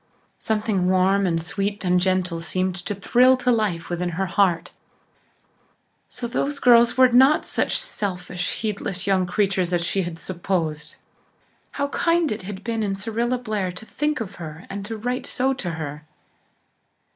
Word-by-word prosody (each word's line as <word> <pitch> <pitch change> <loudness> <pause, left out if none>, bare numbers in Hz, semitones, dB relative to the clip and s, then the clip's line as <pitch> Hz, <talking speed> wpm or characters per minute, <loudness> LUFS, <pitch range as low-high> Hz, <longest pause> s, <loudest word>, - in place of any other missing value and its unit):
Something 210 -4 0
warm 190 +1 +3
and 165 -2 +1
sweet 200 +4 -3
and 180 0 +3
gentle 185 -2 0
seemed 185 +3 -1
to 205 - -2
thrill 250 +6 +4
to 250 0 +1
life 205 -8 0
within 175 0 -2
her 195 - +1
heart. 175 -2 +1 1.4
So 250 - -6
those 280 +4 -1
girls 240 -2 +5
were 255 -1 +7
not 265 +5 +5
such - - 0
selfish, 180 - -3
heedless 200 -4 -3
young 190 -2 +2
creatures 190 -1 0
as 170 -1 +1
she 195 - 0
had 175 -2 -5
supposed! 170 -4 -3 0.8
How 280 0 -1
kind 335 +1 +1
it 215 - -3
had 190 +1 -7
been 230 -1 -2
in 200 -2 -1
Cyrilla 230 +5 -1
Blair 215 -6 -2
to 180 +4 -9
think 295 +4 -1
of 220 -5 -6
her 160 +1 -8
and 205 +3 -6
write 250 +1 -2
so 265 +1 0
to 190 -9 -4
her. 155 -2 -6
195 Hz, 155 wpm, -23 LUFS, 180-235 Hz, 1.4 s, were